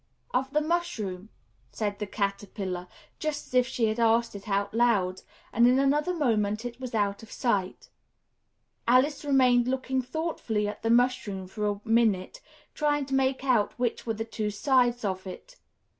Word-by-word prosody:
"Of 265 +1 +1
the 300 +2 +1
mushroom," 235 - -2 0.4
said 205 -2 -3
the 210 - -3
Caterpillar, 195 -2 -3 0.3
just 310 -1 -3
as - - -19
if 250 0 +4
she 245 -3 0
had 220 +1 -1
asked 230 0 +3
it 200 +1 -9
aloud; 200 -2 +1 0.3
and 235 +2 +5
in 250 +1 +4
another 290 +5 +2
moment, 225 - 0
it 240 0 -6
was 250 -3 -5
out 200 -2 0
of 225 - -13
sight. 200 -8 -1 1.0
Alice 260 +5 +3
remained 255 -4 +4
looking 260 0 0
thoughtfully 250 -7 -2
at 210 - -6
the 225 - -1
mushroom 230 -5 +2
for 210 +3 -3
a 205 0 -2
minute, 225 - +1 0.3
trying 295 -2 +1
to 270 - -6
make 265 0 +1
out 245 -6 +2
which 240 -1 -2
were 225 - 0
the 225 +1 -4
two 220 -2 -3
sides 245 +1 +2
of 190 -1 -3
it. - - -10
235 Hz, 165 wpm, -28 LUFS, 205-265 Hz, 1.0 s, and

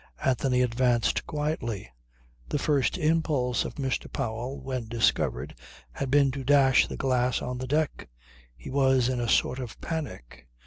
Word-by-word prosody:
Anthony 130 -1 +2
advanced 120 0 +1
quietly. 150 - -3 0.6
The - - 0
first 145 +1 +1
impulse 155 -7 +1
of - - -6
Mr. 135 -2 -2
Powell, 125 +1 -3
when 130 -4 -4
discovered, 115 0 0 0.4
had 135 - -4
been 140 0 +4
to 135 +1 -5
dash 135 -1 +5
the - - -6
glass 125 -1 +1
on 125 0 -4
the 130 - -4
deck. 150 - -1 0.5
He - - -9
was 130 -2 +3
in 130 -1 -1
a 120 -1 -1
sort 130 - +2
of 125 -4 -7
panic. 145 - -6
130 Hz, 150 wpm, -27 LUFS, 125-140 Hz, 0.6 s, dash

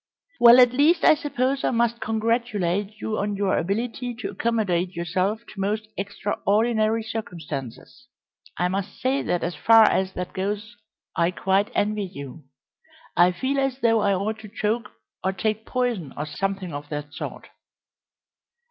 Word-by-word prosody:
"Well, 240 +1 +9
at 245 -1 +6
least 310 +6 +4
I - - +8
suppose 275 -3 -1
I - - +2
must 235 -1 +1
congratulate 215 -3 -1
you 215 -1 -2
on 205 0 -1
your 200 -1 +1
ability 235 +6 -2
to 235 - -5
accommodate 190 -6 0
yourself 185 +6 -1
to 205 - -11
most 215 +2 -1
extraordinary 215 +3 0
circumstances. 170 - -7 0.5
I 180 - +2
must 195 +2 -4
say 265 +2 +1
that 175 - -1
as 175 - -1
far 225 +3 +6
as 190 -3 +2
that 180 0 -5
goes 210 +4 -3 0.4
I 170 0 +2
quite 190 +3 +1
envy 210 0 0
you. 140 0 -9 0.7
I 175 +1 +5
feel 260 +10 -1
as 270 -1 0
though 225 -1 +4
I 200 -2 +2
ought 215 +3 -2
to 215 -1 -10
choke 220 +2 -2 0.3
or 190 - +1
take 215 +3 -2
poison, 245 - -2
or 150 - -2
something 190 +2 -3
of 145 0 -6
that 150 -1 -5
sort." - - -7
210 Hz, 155 wpm, -24 LUFS, 185-230 Hz, 0.7 s, Well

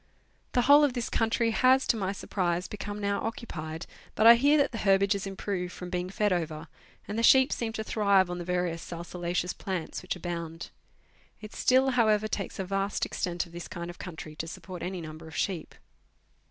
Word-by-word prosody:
The 245 - +3
whole 285 +3 +7
of 285 -4 +3
this 240 -2 -3
country 230 0 +1
has, 260 +3 +4
to - - +2
my 195 -3 -1
surprise, 180 -3 -2
become 205 +1 -6
now 200 0 -1
occupied, 165 -8 -5 0.3
but 215 - +2
I 230 - +12
hear 285 +6 +4
that 285 -1 +2
the 230 - -5
herbage 195 0 +3
has 200 0 -3
improved 190 -2 -3
from 180 -1 -8
being 180 0 -2
fed 205 0 +1
over, 160 -2 -3 0.4
and 210 +2 -3
the - - +1
sheep 265 +3 +6
seem 230 -2 -2
to 220 - -3
thrive 200 -4 +3
on 175 0 -5
the - - -4
various 180 -1 -1
salsolaceous 175 +1 -3
plants 185 -4 -4
which 185 - -3
abound. 170 -2 -5 0.7
It 215 -1 -10
still, 260 +1 +3
however 215 -4 +3
takes - - -4
a 190 - -3
vast 195 +1 -1
extent 175 -1 -2
of 170 - -16
this 175 +1 -7
kind 170 0 -6
of 175 - -17
country 160 -3 -8
to 165 - -4
support 180 +1 -8
any 180 -1 -4
number 155 0 -9
of 160 - -11
sheep. 180 -6 -2
190 Hz, 200 wpm, -28 LUFS, 175-220 Hz, 0.7 s, I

